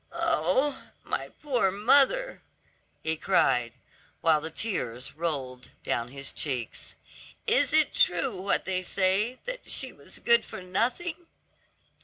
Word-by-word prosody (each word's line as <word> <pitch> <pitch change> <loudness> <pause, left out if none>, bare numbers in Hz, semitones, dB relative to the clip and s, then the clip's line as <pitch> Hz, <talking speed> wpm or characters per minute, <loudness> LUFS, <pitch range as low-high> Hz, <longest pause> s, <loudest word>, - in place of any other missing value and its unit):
"Oh, 280 - +1 0.2
my - - -3
poor 250 -9 +2
mother!" 275 - +3 0.6
he 160 0 +1
cried, 125 -10 +2 0.5
while 160 -2 +4
the 160 - -4
tears 135 - -3
rolled 135 -6 -4
down 120 0 -1
his 140 +2 -4
cheeks. 125 -6 -2 0.5
"Is - - +3
it - - +3
true 205 +6 +2
what 200 - 0
they 185 -1 -1
say, 195 +6 +1
that - - -6
she - - +1
was - - -11
good 470 0 +4
for 185 - -9
nothing?" 250 - -2
185 Hz, 125 wpm, -28 LUFS, -, 0.6 s, while